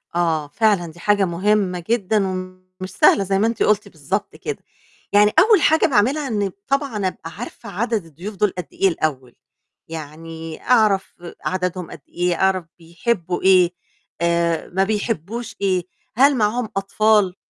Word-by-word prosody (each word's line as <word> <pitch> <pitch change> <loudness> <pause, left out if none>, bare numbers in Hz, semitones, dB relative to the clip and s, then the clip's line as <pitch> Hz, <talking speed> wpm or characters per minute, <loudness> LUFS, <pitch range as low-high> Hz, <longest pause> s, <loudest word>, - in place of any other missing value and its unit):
آه 160 -4 0
فعلًا، 200 0 +1
دي 175 - -17
حاجة 205 +1 +2
مهمة 185 0 0
جدًا 210 -3 +1
ومش 185 0 -7
سهلة 195 +1 +4
زي 195 0 0
ما 220 - +3
أنتِ 230 - 0
قُلتِ 210 -2 +2
بالضبط 180 +7 -4
كده. 445 - -6 0.5
يعني 210 +1 +6
أول 420 -2 +5
حاجة 315 +2 +4
باعملها 275 +3 +2
إن 205 -5 -1 0.2
طبعًا 270 -8 0
أبقى 165 -2 -7
عارفة 230 +3 -9
عدَدْ 220 -1 -2
الضيوف 175 +7 -9
دُول 210 +1 +1
قد 180 - -4
إيه 195 - +2
الأول؟ 140 -8 -2 0.5
يعني 160 +1 -8
أعرف 215 -6 +2 0.3
عدَدْهُم 180 -1 -2
قد 145 - -10
إيه، 175 0 0
أعرف 190 -2 +1
بيحبّوا 175 +1 -2
إيه، 185 -2 +5 0.5
آآ، 170 -1 +1
ما 190 +2 +1
بيحبوش 220 +1 -3
إيه، 185 -3 +1 0.3
هل 275 +2 +5
معاهم 220 +1 0
أطفال؟ 200 -1 +2
190 Hz, 150 wpm, -21 LUFS, 170-215 Hz, 0.5 s, يعني